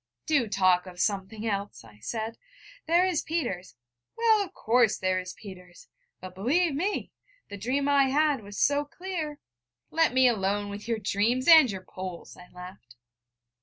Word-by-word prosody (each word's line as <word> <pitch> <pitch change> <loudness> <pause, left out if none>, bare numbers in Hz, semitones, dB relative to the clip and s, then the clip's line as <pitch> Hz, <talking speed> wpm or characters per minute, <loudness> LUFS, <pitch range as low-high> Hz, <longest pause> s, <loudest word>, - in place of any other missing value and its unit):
'Do 285 -7 +2
talk 185 -3 +2
of 180 -1 -11
something 205 +2 -2
else!' 200 - -3
I 105 -2 -17
said. 220 - -5 0.5
'There 345 +3 +4
is 360 -4 0
Peters....' 195 - -4 0.4
'Well, 450 -2 +4
of 375 - -10
course, 230 - +2
there 185 0 0
is 180 0 -7
Peters. 180 -3 -13 0.3
But 185 0 -9
believe 285 - +1
me, 370 +9 -2 0.4
the 200 - -7
dream 260 +7 -1
I 280 -1 +4
had 290 -2 +2
was 205 0 -10
so 285 0 +2
clear 315 -1 -5 0.3
' 120 0 -55
'Let 325 -2 +3
me 260 0 +6
alone 205 -2 0
with 205 +2 -8
your 230 -1 0
dreams, 220 +5 0
and 320 -6 +8
your 190 -2 -6
Poles!' 185 -2 -8
I 180 - -14
laughed. 180 -9 -12
220 Hz, 165 wpm, -27 LUFS, 185-290 Hz, 0.5 s, and